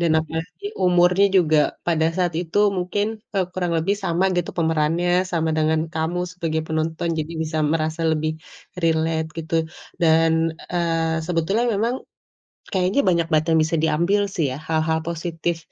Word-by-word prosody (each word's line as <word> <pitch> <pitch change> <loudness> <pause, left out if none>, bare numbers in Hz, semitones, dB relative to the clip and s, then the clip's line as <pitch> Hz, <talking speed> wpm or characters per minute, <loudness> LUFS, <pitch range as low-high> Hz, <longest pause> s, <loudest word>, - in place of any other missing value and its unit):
Dan 170 -2 +2
apalagi 160 - -6 0.2
umurnya 180 +2 +4
juga 155 -4 +4 0.3
pada 160 -2 +2
saat 180 -2 +1
itu 175 +2 -2 0.2
mungkin, 185 +3 -1 0.3
eee, 190 - +2
kurang 180 -2 -2
lebih 165 +5 +1
sama 175 +1 +1
gitu 175 - -1
pemerannya, 165 +2 +1 0.2
sama 160 -1 0
dengan 155 0 +2
kamu 160 +2 -1
sebagai 165 -3 -2
penonton. 160 +1 -2
Jadi 155 +1 -3
bisa 155 0 -3
merasa 160 0 -1
lebih 155 0 0 0.5
relate, 160 -1 +1
gitu. 165 +1 -4 0.5
Dan, 165 0 +4 0.4
eee, 165 -2 0
sebetulnya 180 +7 0
memang 230 +5 0 0.8
kayaknya 190 +6 +1
banyak 170 -2 +3
banget 155 0 +3
yang 160 - +4
bisa 160 +2 -1
diambil 170 +6 +2
sih 165 - +1
ya, 130 - -5
hal-hal 160 0 +1
positif 170 0 -2
165 Hz, 150 wpm, -22 LUFS, 160-175 Hz, 0.8 s, umurnya